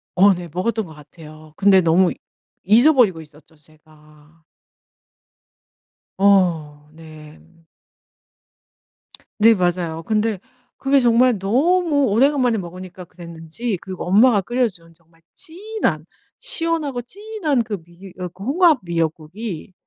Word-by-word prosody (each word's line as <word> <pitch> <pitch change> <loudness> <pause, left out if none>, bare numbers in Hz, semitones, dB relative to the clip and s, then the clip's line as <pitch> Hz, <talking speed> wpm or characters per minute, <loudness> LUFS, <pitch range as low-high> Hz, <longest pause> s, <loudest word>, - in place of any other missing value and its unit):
어 195 +2 +5
네 175 -1 -7
먹었던 215 +3 -2
것 160 - -13
같아요. 155 +1 -15
근데 195 -1 +4
너무 170 +2 +3 0.5
잊어버리고 225 - +4
있었죠 150 +1 -19
제가. 155 +1 -22 1.7
어 165 -7 +1
네. 155 -1 -14 2.0
네 225 +1 +6
맞아요. 175 -3 -2
근데 215 -1 -1 0.4
그게 275 0 +2
정말 240 -1 +3
너무 290 - +1
오래간만에 250 +1 +2
먹으니까 180 0 -9
그랬는지 170 +5 -6
그리고 185 -2 -7
엄마가 210 +2 +4
끓여준 190 -8 -3
정말 165 0 -30
진한 420 +7 -3 0.3
시원하고 330 - -2
진한 385 - -3
그 210 -2 -5
미 175 +3 -15 0.2
그 195 - -12
홍합 315 - +3
미역국이 170 +3 -4
190 Hz, 235 characters per minute, -20 LUFS, 165-245 Hz, 2.0 s, 네